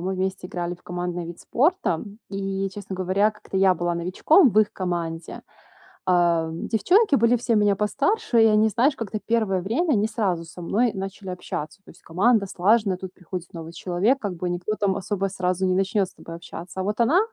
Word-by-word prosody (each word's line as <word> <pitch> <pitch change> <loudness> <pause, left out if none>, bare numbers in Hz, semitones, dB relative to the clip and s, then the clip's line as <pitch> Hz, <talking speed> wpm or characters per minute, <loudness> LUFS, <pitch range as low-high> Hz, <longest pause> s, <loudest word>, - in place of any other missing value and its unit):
мы 190 +1 -2
вместе 185 -1 -3
играли 175 0 -3
в 175 - -22
командный 175 -1 -4
вид 170 0 -8
спорта, 320 - +1
м, 205 0 -11
и 195 0 -2
честно 195 -1 -7
говоря 190 +3 +2
как-то 210 -2 -8
я 190 -1 +5
была 175 0 -1
новичком 210 - +4
в 215 - +2
их 215 -1 +3
команде. 170 -3 -4 0.7
Э, 170 -2 +3
девчонки 325 - +2
были 235 +1 +4
все 235 0 0
меня 205 -1 +3
постарше 235 - +1
и - - +6
они 215 0 +4
знаешь 260 +7 +2
как-то 215 -2 -4
первое 220 -5 +1
время 270 - 0
не 210 +1 +2
сразу 195 -7 -1
со 175 +2 -11
мной 220 +6 +1
начали 195 0 -6
общаться. 180 0 -6
То - - -14
есть - - -20
команда 200 +5 +2
слаженная, 195 +1 +2
тут 185 0 -8
приходит 180 -1 -7
новый 165 -1 -8
человек, 195 +11 +1
как 205 -6 -3
бы 180 +1 -2
никто 175 +5 -2
там 195 -2 +1
особо 195 0 -2
сразу 185 -1 -1
не 185 - +2
начнёт 195 0 +1
с - - -16
тобой 165 - -10
общаться. 175 +2 -9
А - - -2
вот 210 +3 -2
она, 290 +11 +4
195 Hz, 200 wpm, -24 LUFS, 180-215 Hz, 0.7 s, и